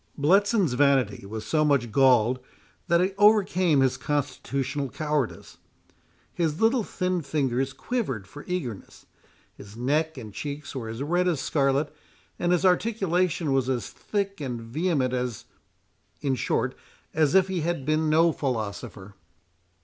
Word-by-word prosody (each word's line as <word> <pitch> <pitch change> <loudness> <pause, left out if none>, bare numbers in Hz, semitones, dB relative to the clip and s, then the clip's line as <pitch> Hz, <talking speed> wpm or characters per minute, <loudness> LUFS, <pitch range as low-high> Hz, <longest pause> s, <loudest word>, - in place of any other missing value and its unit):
Bletson's 190 - +3
vanity 130 -8 +2
was 110 +1 -6
so 155 -1 +2
much 140 -6 +2
galled 125 -1 +4 0.5
that 170 +1 +3
it 190 +2 0
overcame 185 -7 +4
his 130 -1 +2
constitutional 140 -1 -2
cowardice. 150 -3 -3 0.7
His 160 -3 -1
little 230 +2 +3
thin 185 -3 -2
fingers 135 -3 -1
quivered 135 - -3
for 145 +10 -11
eagerness, 140 - -5 0.5
his 100 +2 -13
neck 150 +5 0
and 110 -5 -8
cheeks 145 +6 -6
were 115 -4 -4
as 115 +4 -4
red 175 +4 +1
as 165 -6 +1
scarlet, 140 +1 0 0.4
and 175 - +1
his 180 +1 +2
articulation 180 -6 +1
was 135 -1 +1
as 125 -2 -2
thick 200 -4 -3
and 125 -4 -3
vehement 130 +2 -1
as—in 125 +2 -6
short, 130 - 0 0.4
as 155 -1 +2
if 190 -1 +5
he 185 -3 -2
had 165 -4 -2
been 155 +1 +1
no 165 +2 +4
philosopher. 105 -7 -4
145 Hz, 135 wpm, -26 LUFS, 130-175 Hz, 0.7 s, if